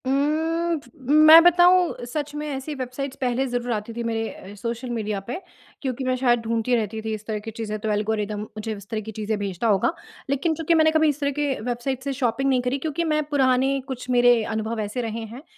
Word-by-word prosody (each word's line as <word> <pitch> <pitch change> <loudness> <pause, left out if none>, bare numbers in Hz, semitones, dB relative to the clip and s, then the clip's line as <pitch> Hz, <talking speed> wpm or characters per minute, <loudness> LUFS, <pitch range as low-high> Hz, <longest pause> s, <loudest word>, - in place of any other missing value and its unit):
उम्म, 320 +5 +1 0.5
मैं 320 +2 +11
बताऊँ 350 -4 +4
सच 290 +4 -4
में 300 0 -4
ऐसी 280 +1 -4
वेबसाइट्स 260 +1 -5
पहले 255 +1 +1
ज़रूर 245 0 -2
आती 215 0 -3
थी 235 +1 -4
मेरे 225 -1 -2
अ, 195 - -11
सोशल 235 +4 -4
मीडिया 215 -4 -2
पे 245 - -3 0.5
क्योंकि 265 -1 -3
मैं 255 0 +1
शायद 245 -2 +3
ढूँढती 230 +2 0
रहती 220 -1 -2
थी 220 0 -3
इस 215 0 -6
तरह 215 -1 -3
की 225 +2 -7
चीज़ें, 215 -1 -4
तो 220 - -3
एल्गोरिदम 210 0 -1
मुझे 215 +1 -6
इस 200 0 -13
तरह 220 -1 -2
की 220 +1 -8
चीज़ें 215 0 -2
भेजता 200 +1 -2
होगा। 210 - +2 0.4
लेकिन 300 +4 +1
चूँकि 325 +2 +1
मैंने 315 -1 +5
कभी 315 -1 +3
इस 290 0 -2
तरह 280 -1 0
के 290 0 0
वेबसाइट 245 +2 -3
से 280 0 -2
शॉपिंग 265 +1 0
नहीं 255 -2 +2
करी 250 +2 -1
क्योंकि 315 +3 -2
मैं 305 0 +1
पुराने 270 -1 +2
कुछ 255 -2 -6
मेरे 245 -2 +5
अनुभव 220 +1 -2
ऐसे 215 +4 -3
रहे 225 -1 -4
हैं 265 - -10
245 Hz, 215 wpm, -24 LUFS, 220-280 Hz, 0.5 s, मैं